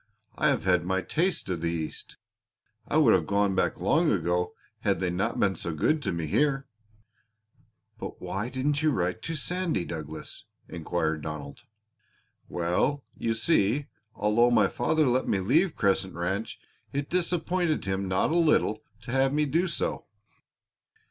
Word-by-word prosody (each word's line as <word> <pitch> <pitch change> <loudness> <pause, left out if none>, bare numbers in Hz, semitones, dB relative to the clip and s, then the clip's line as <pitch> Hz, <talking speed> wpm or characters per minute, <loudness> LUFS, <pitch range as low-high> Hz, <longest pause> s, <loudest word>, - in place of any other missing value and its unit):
I - - +2
have - - +1
had 90 -2 +3
my 95 +1 0
taste 175 +3 0
of 85 -3 -2
the 85 - 0
East! 80 -2 -5 0.7
I 150 - +1
would 140 -8 +6
have 85 -5 +2
gone 100 -1 +2
back 95 - 0
long 155 - +3
ago 90 -1 0 0.2
had - - +1
they 90 -1 0
not 90 +3 -1
been 95 -2 +2
so 85 0 -4
good 155 - +2
to - - -1
me 85 -2 -2
here." 140 - +1 1.3
"But - - -7
why 100 +5 -3
didn't 140 +3 0
you 155 - +3
write 90 -5 -1
to 165 - -4
Sandy, 170 - -1
Douglas?" 80 -1 -7 0.2
inquired 80 -2 -2
Donald. 75 -2 -7 0.8
"Well, 90 +12 0
you 115 -1 -1
see, 140 +1 +2 0.3
although 105 +4 +3
my 110 -5 +4
father 155 +9 +1
let 130 0 +1
me 100 - +1
leave 150 - +2
Crescent 95 -2 +1
Ranch 95 +6 -2 0.3
it 140 0 -2
disappointed 175 - 0
him 95 0 -1
not 95 +9 +1
a - - +1
little 155 -10 +3 0.2
to 120 +2 -7
have 135 +1 +3
me 150 +1 +2
do 165 +6 +1
so. - - -3
105 Hz, 160 wpm, -27 LUFS, 90-150 Hz, 1.3 s, would